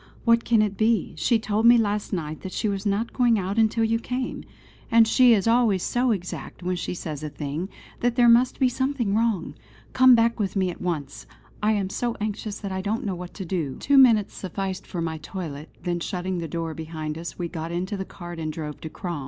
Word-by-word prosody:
What 230 -1 +4
can 225 -2 +3
it 200 -2 -2
be? 220 -3 +1
She 225 - +2
told 220 +1 +1
me 240 0 +8
last 210 -2 0
night 155 -4 -4
that 190 - -6
she - - -1
was 200 0 -2
not 205 +4 -1
going 240 -3 +3
out 195 +3 -1
until 225 +1 +3
you 225 +1 +1
came; 250 +2 -4 0.5
and 230 -1 +6
she 245 0 +6
is 200 +1 0
always 230 -5 +3
so 245 +1 +1
exact 185 -3 -4
when 180 +1 -1
she 180 - -4
says 155 -4 -5
a 155 - -4
thing, 150 +5 -4 0.3
that 245 0 +1
there 245 -1 +5
must 240 +2 +4
be 260 - +4
something 260 -4 -1
wrong. 225 -3 0 0.4
Come 255 -1 +7
back 230 0 +2
with 200 -2 -1
me 190 -2 +1
at - - -11
once! 155 -6 -4 0.3
I 215 +1 +3
am 195 -2 -1
so 240 +2 -2
anxious 210 0 -3
that 200 - -4
I 190 0 -2
don't 210 +4 -2
know 195 - -1
what 180 0 -8
to 190 - -6
do." 165 -7 -3
Two 280 0 +4
minutes 225 -6 +5
sufficed 190 0 -5
for 175 - -4
my 160 -1 -3
toilet; 155 -2 -7
then 175 -1 -1
shutting 180 0 -3
the 165 - -4
door 165 +1 -3
behind 155 -1 -5
us, 165 0 -7
we 175 - -2
got 165 -1 -5
into 185 +4 -2
the 190 - -3
cart 175 -3 -9
and 155 -1 -3
drove 150 -1 -6
to 160 - -6
Crom. 170 -1 -5
195 Hz, 225 wpm, -25 LUFS, 170-230 Hz, 0.5 s, me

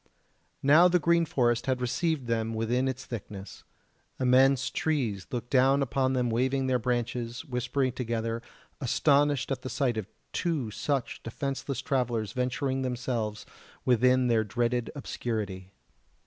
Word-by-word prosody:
Now 155 +6 +7
the 180 0 +4
green 170 0 +3
forest 120 -5 +1
had 130 -1 +1
received 140 +3 -1
them 115 -1 -1
within 120 +4 0
its 130 -1 -3
thickness; 100 -4 -8 0.6
immense 130 +1 +4
trees 120 -12 -1
looked 120 0 -5
down 135 +1 +4
upon 130 +1 0
them 125 -2 +1
waving 130 +3 +1
their 130 -1 +2
branches, 120 +1 -2
whispering 130 0 -1
together, 115 -2 -2 0.4
astonished 145 +1 +2
at 135 - -2
the 130 - -5
sight 130 -5 0
of 105 -3 -3 0.3
two 155 -11 -1
such 135 +3 -2
defenceless 135 +2 -4
travellers 120 -7 0
venturing 130 +1 -1
themselves 120 -4 -2 0.4
within 125 +1 +4
their 115 -2 +3
dreaded 120 +2 -1
obscurity. 105 -8 -4
125 Hz, 135 wpm, -28 LUFS, 115-135 Hz, 0.6 s, Now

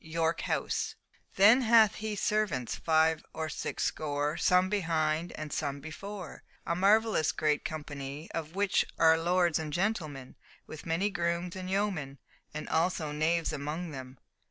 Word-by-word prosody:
YORK 165 +1 -1
HOUSE - - -1 0.4
"Then 215 +7 +7
hath 225 -3 +6
he 215 -1 -2
servants 205 - 0
five 160 0 +2
or 160 0 -3
six - - -3
score, 145 0 -1
Some 180 +2 +3
behind 165 -4 0
and 155 -2 -6
some 140 -2 -2
before; 180 +5 -8 0.2
A 170 - 0
marvellous 205 -2 +3
great 150 -1 0
company 145 -1 -6
Of 165 +1 -5
which 200 0 +2
are 160 0 +6
lords 175 0 +2
and 155 -1 -4
gentlemen, 155 -8 -2 0.3
With 155 - -10
many 180 +6 0
grooms 170 -1 -2
and 185 -1 -6
yeomen 190 -9 -1 0.3
And 155 0 -6
also 160 -2 0
knaves 160 +2 0
among 155 +4 -4
them." 130 -2 -8
165 Hz, 145 wpm, -30 LUFS, 155-190 Hz, 0.4 s, Then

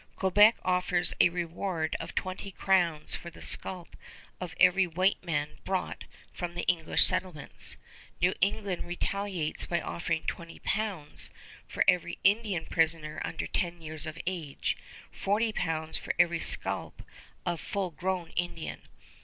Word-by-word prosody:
Quebec 205 +4 +5
offers 180 -1 +3
a - - +6
reward 170 -1 -2
of - - -7
twenty 185 +1 -3
crowns 175 -5 +1
for 170 - 0
the 170 - -15
scalp 180 -3 +1 0.4
of 180 -2 -6
every 185 +1 +5
white 185 +4 +1
man 150 -4 -2
brought 190 -1 -3 0.3
from 175 -1 -5
the 175 - -2
English 165 -3 +3
settlements. 180 -5 +1 0.4
New 180 +2 +3
England 200 -1 0
retaliates 175 -2 -2
by 170 - 0
offering 165 -1 -2
20 170 -1 -5
pounds 200 -8 -2 0.4
for - - 0
every 175 -1 +2
Indian 200 -4 +2
prisoner 160 -2 +1
under - - -3
ten 175 -1 -1
years 155 -1 +4
of 155 +1 -6
age, 170 -6 -2 0.4
40 215 +3 0
pounds 160 -4 -1
for - - -3
every 170 -1 +3
scalp - - 0 0.4
of 175 -2 -2
full 195 -3 -2
grown 180 0 -3
Indian. 175 -2 -3
175 Hz, 135 wpm, -29 LUFS, 165-190 Hz, 0.4 s, a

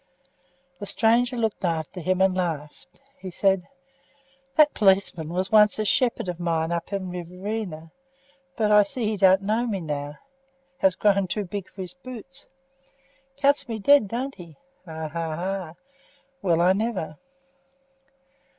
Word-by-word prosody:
The 205 - -6
stranger 240 +4 +2
looked 220 -3 -1
after 165 0 -2
him 185 +2 0
and 190 -1 +3
laughed. 160 - -4 0.2
He 190 - -7
said: 190 0 +1 0.9
"That 305 -1 +5
policeman 190 -6 +2
was 185 +3 -2
once 210 -1 +6
a 215 - -1
shepherd 235 0 +1
of 175 -1 -4
mine 165 -1 -1
up 170 +2 -3
in 190 -2 -3
Riverina, 180 -1 -5 0.7
but 215 -2 +2
I 210 0 +8
see 215 +4 -2
he 215 0 0
don't 190 0 +4
know 220 +4 0
me 205 -4 -2
now 145 -2 -5 0.6
has 190 -6 +3
grown 200 -2 +2
too 205 +4 -2
big 195 +1 -6
for 190 - -9
his 180 - -8
boots. 270 +1 -8 0.9
Cuts 280 -2 +2
me 225 - -2
dead, 275 +2 +5
don't 255 +6 -3
he? 170 -5 -13 0.3
Ha! 160 -2 -6
ha! 165 0 -3
ha! 185 -1 -4 0.7
Well 170 -3 +2
I 180 +2 +5
never!" 195 -8 -3
190 Hz, 150 wpm, -25 LUFS, 170-220 Hz, 0.9 s, I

